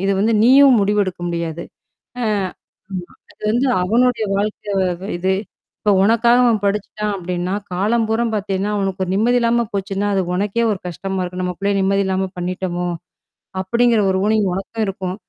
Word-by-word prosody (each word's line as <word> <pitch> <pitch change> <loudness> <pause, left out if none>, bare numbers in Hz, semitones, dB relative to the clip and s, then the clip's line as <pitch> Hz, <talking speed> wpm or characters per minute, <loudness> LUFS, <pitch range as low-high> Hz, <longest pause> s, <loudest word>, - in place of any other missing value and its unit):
அ - - -4
இது 200 - +2
வந்து 220 +3 +2
நீயும் 265 0 +7
முடிவெடுக்க 200 -3 0
முடியாது. 170 -1 -3 0.6
ஆ - - 0 0.7
ஆமா. 180 -2 -5 0.2
அது - - -34
வந்து 240 +5 +1 0.2
அவனுடைய 230 +4 +2
வாழ்க்கை 205 0 -2
வ - - +2 0.3
இது. 190 +2 +1 0.5
இப்ப 210 - +2
உனக்காக 230 +3 +4
அவன் 230 -3 +3
படிச்சுட்டான் 210 +1 -1
அப்டின்னா, 180 0 -3 0.2
காலம்பூராம் 225 +4 +1
பாத்தீங்கன்னா, 200 -1 -1
அவனுக்கு 195 -1 -2
ஒரு 180 - -5
நிம்மதி 235 +5 +3
இல்லாம 235 0 +2
போச்சுன்னா, 200 0 -2
அது 190 - +2
உனக்கே 205 +5 0
ஒரு 200 - -3
கஷ்டமா 190 +2 -4
இருக்கும். 180 0 -4
நம்ம 180 0 -2
புள்ளய 200 0 0
நிம்மதி 195 +1 +2
இல்லாம 190 0 -1
பண்ணிட்டோமோ! 180 0 -3 0.7
அப்படிங்கிற 235 +4 +2
ஒரு 190 - +1
ஊண்டிங் 215 -1 +2
உனக்கும் 215 +4 -3
இருக்கும். 190 -1 -4
200 Hz, 160 wpm, -19 LUFS, 185-225 Hz, 0.7 s, நீயும்